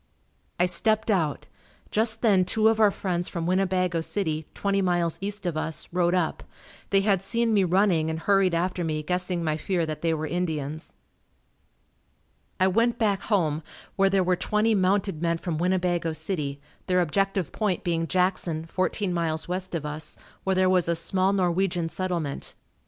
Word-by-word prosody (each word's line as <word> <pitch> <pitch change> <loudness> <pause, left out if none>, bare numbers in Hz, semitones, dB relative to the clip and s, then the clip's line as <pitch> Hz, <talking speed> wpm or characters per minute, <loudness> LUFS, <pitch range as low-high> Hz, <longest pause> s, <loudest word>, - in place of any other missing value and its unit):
I 180 - +4
stepped 215 +5 +2
out. 160 -8 0 0.5
Just 220 +1 +1
then 200 -5 +5
two 215 +4 +3
of 225 0 +1
our 215 -2 +6
friends 180 -3 -2
from 170 -3 -4
Winnebago 185 -2 +1
City, 160 -4 -2
twenty 200 0 0
miles 175 -3 0
east 205 0 -4
of 175 -3 -1
us, 155 0 -3
rode 175 0 +2
up. 175 -3 0 0.5
They 195 -1 +4
had 195 -2 +2
seen 230 +3 0
me 200 -2 +4
running 180 -3 +2
and 160 - -2
hurried 195 0 +2
after 180 +1 -1
me 155 -2 -2
guessing 180 +1 -1
my 155 -1 0
fear 175 +1 -1
that 155 -1 -5
they 165 - +1
were 155 0 -3
Indians. 155 -3 -3 1.6
I 185 - +4
went 230 +5 +2
back 205 -4 +1
home 165 -8 0 0.3
where 195 0 +3
there 195 -1 +2
were 180 0 +2
twenty 215 +4 +1
mounted 190 -3 +1
men 170 -1 +1
from 165 -2 -3
Winnebago 175 -2 0
City, 150 -3 -3 0.3
their 180 -1 +3
objective 195 +1 0
point 205 -5 -1
being 165 -1 0
Jackson, 180 -3 0
fourteen 185 +2 -1
miles 160 -2 -2
west 180 0 -3
of 155 -3 -3
us 150 +1 -4 0.3
where 190 0 +1
there 185 0 +3
was 180 -2 +2
a 170 - +2
small 185 +3 +1
Norwegian 180 -2 0
settlement. 170 -6 -3
180 Hz, 170 wpm, -26 LUFS, 165-195 Hz, 1.6 s, our